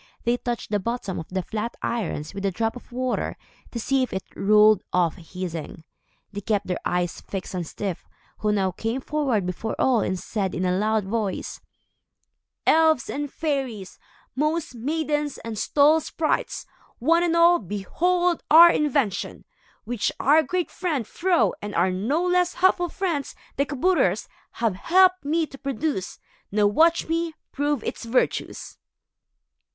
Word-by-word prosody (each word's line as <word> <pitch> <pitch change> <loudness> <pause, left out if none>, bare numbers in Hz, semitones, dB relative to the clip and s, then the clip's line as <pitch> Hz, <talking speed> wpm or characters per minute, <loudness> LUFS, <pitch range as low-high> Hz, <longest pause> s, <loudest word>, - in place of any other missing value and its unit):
They 235 +1 +2
touched 240 -3 -4
the 205 - +2
bottom 205 -2 -3
of 160 - -7
the 185 0 -2
flat 220 +5 -4
irons 170 -9 -3
with 195 - -6
a - - +2
drop 225 +5 -2
of 245 - -12
water 255 +1 -2 0.3
to 235 - -5
see 270 +4 +1
if 255 - -1
it 190 - -3
rolled 210 +1 +5
off 175 -3 +2
hissing. 170 -2 -7 0.5
They 205 0 -6
kept 205 0 0
their 180 -1 -2
eyes 175 -1 -1
fixed 195 -1 -6
on 180 - -2
Styf, 185 +2 -5 0.3
who 210 - +1
now 195 -2 +1
came 225 +7 -3
forward 265 -8 -1
before 180 +5 -3
all 255 -3 +3
and 185 - -1
said, 195 -2 -3
in 180 +3 -1
a 180 0 +1
loud 215 +1 +1
voice: 205 -1 -3 1.0
"Elves 315 -5 +4
and 290 -1 -4
fairies, 265 - -3 0.4
moss 305 +2 -1
maidens 295 +3 -2
and 230 -1 -4
stall 295 +8 +4
sprites, 310 0 -2 0.3
one 330 +7 +3
and 340 -1 +1
all, 340 +1 +6
behold 340 - 0
our 340 +2 +9
invention, 275 - -1 0.4
which 235 -1 -1
our 300 +4 +5
great 360 +2 -2
friend 310 -10 -2
Fro 350 - +1
and 205 0 -6
our 180 +2 +3
no 250 - 0
less 360 0 +2
helpful 360 -1 +3
friends, 330 -8 -2 0.2
the 280 +1 0
kabouters, 280 - +1 0.3
have 230 -3 0
helped 370 - +4
me 320 +3 +1
to 275 -3 -13
produce. 275 - -3 0.3
Now 210 +1 +3
watch 325 +11 +3
me 330 0 -1 0.2
prove 290 -3 -1
its - - -5
virtues." 230 +2 -1
245 Hz, 155 wpm, -24 LUFS, 200-315 Hz, 1.0 s, our